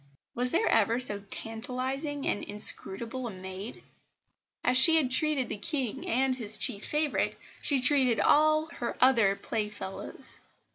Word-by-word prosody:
Was 250 Hz, +1 st, -3 dB
there 340 Hz, -, -1 dB
ever 225 Hz, +2 st, +1 dB
so 210 Hz, -5 st, +3 dB
tantalising 260 Hz, +7 st, -6 dB
and -, -, -3 dB
inscrutable 225 Hz, +4 st, +3 dB
a -, -, -6 dB
maid? 190 Hz, +3 st, -10 dB, 0.9 s
And -, -, +1 dB
as 255 Hz, -, +1 dB
she 325 Hz, +5 st, +6 dB
had 280 Hz, -6 st, 0 dB
treated 285 Hz, -2 st, +1 dB
the -, -, -7 dB
King 265 Hz, -1 st, -4 dB
and 260 Hz, +2 st, -1 dB
his 220 Hz, -4 st, +4 dB
chief 215 Hz, -6 st, +2 dB
favourite, 300 Hz, -1 st, -2 dB, 0.3 s
she 280 Hz, -3 st, +1 dB
treated 255 Hz, -3 st, +4 dB
all 310 Hz, +1 st, +2 dB
her 235 Hz, -, -6 dB
other 230 Hz, -6 st, +3 dB
playfellows. 210 Hz, -3 st, -8 dB
250 Hz, 145 wpm, -26 LUFS, 215-275 Hz, 0.9 s, she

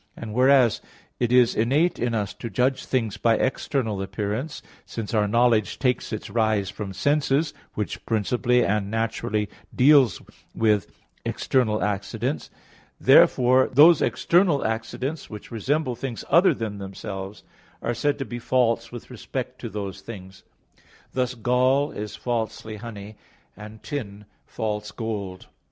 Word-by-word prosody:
And 110 Hz, -2 st, -7 dB
whereas 130 Hz, -1 st, +4 dB, 0.4 s
it 120 Hz, -1 st, 0 dB
is 125 Hz, -2 st, +5 dB
innate 145 Hz, +10 st, +1 dB
in 120 Hz, -1 st, 0 dB
us 105 Hz, -2 st, -2 dB
to 115 Hz, -, -7 dB
judge 130 Hz, +5 st, 0 dB
things 115 Hz, -6 st, -1 dB
by 115 Hz, -1 st, +3 dB
external 120 Hz, -4 st, -1 dB
appearances, 105 Hz, +9 st, -4 dB, 0.2 s
since 115 Hz, -2 st, -6 dB
our 105 Hz, -2 st, +2 dB
knowledge 115 Hz, -2 st, +2 dB
takes 125 Hz, -3 st, 0 dB
its 110 Hz, -, -4 dB
rise 110 Hz, -4 st, 0 dB
from 100 Hz, -2 st, -6 dB
sense, 145 Hz, -, +1 dB, 0.2 s
which 105 Hz, -, -4 dB
principally 120 Hz, +3 st, +2 dB
and 100 Hz, -1 st, 0 dB
naturally 110 Hz, -1 st, -1 dB, 0.3 s
deals 130 Hz, -, +5 dB, 0.4 s
with 105 Hz, -4 st, +2 dB, 0.4 s
external 110 Hz, -5 st, 0 dB
accidents, 105 Hz, +6 st, -2 dB, 0.5 s
therefore 130 Hz, +1 st, +5 dB
those 150 Hz, +4 st, +7 dB
external 170 Hz, -4 st, +2 dB
accidents, 115 Hz, +7 st, -3 dB
which 105 Hz, -2 st, -10 dB
resemble 130 Hz, +4 st, -1 dB
things 120 Hz, -1 st, -6 dB
other 180 Hz, +3 st, +5 dB
than 105 Hz, -3 st, -4 dB
themselves, 95 Hz, 0 st, -7 dB, 0.4 s
are 120 Hz, -, 0 dB
said 145 Hz, +5 st, 0 dB
to 135 Hz, -, -4 dB
be 120 Hz, -1 st, -6 dB
false 115 Hz, -2 st, +1 dB
with 120 Hz, +1 st, -9 dB
respect 125 Hz, +1 st, -5 dB
to 115 Hz, -, -5 dB
those 100 Hz, -2 st, -5 dB
things; 95 Hz, -3 st, -10 dB, 0.7 s
thus 125 Hz, -1 st, -1 dB
gall 130 Hz, +5 st, +2 dB
is 105 Hz, 0 st, -6 dB
falsely 110 Hz, -2 st, -3 dB
honey; 105 Hz, -1 st, -9 dB, 0.4 s
and 105 Hz, +1 st, -11 dB
tin, 105 Hz, -7 st, -6 dB, 0.2 s
false 105 Hz, -1 st, -3 dB
gold. 100 Hz, -5 st, -5 dB
115 Hz, 135 wpm, -24 LUFS, 105-130 Hz, 0.7 s, those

